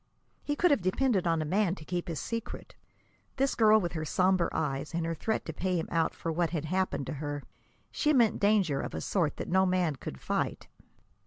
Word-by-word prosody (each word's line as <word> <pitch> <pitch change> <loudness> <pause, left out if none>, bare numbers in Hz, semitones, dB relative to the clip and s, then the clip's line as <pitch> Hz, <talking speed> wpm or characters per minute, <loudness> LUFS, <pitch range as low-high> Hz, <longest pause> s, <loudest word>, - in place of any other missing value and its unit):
He 290 - -1
could 355 +3 +3
have 280 - +3
depended 190 +1 +1
on 165 -2 +1
a - - -5
man 190 +2 +1
to 155 - -12
keep 175 +1 -3
his 165 -3 -3
secret. 230 -1 -5 0.6
This 275 0 +1
girl 220 -1 +5
with 175 -4 -2
her 155 -2 -3
somber 180 +2 +2
eyes 150 +1 -2
and 170 -1 -1
her 165 - -1
threat 220 +7 -2
to - - -5
pay 185 -1 -1
him 165 - -2
out 165 -1 +1
for 165 - -3
what 170 +1 0
had 160 -3 -3
happened 185 -4 -1
to - - -4
her 145 -1 -4 0.5
she 305 - +1
meant 240 -7 +3
danger 200 -9 +2
of - - -5
a - - -3
sort 165 -7 0
that - - -5
no 190 +1 +3
man 180 -6 +1
could 65 - -7
fight. - - -2
180 Hz, 220 wpm, -30 LUFS, 160-210 Hz, 0.6 s, girl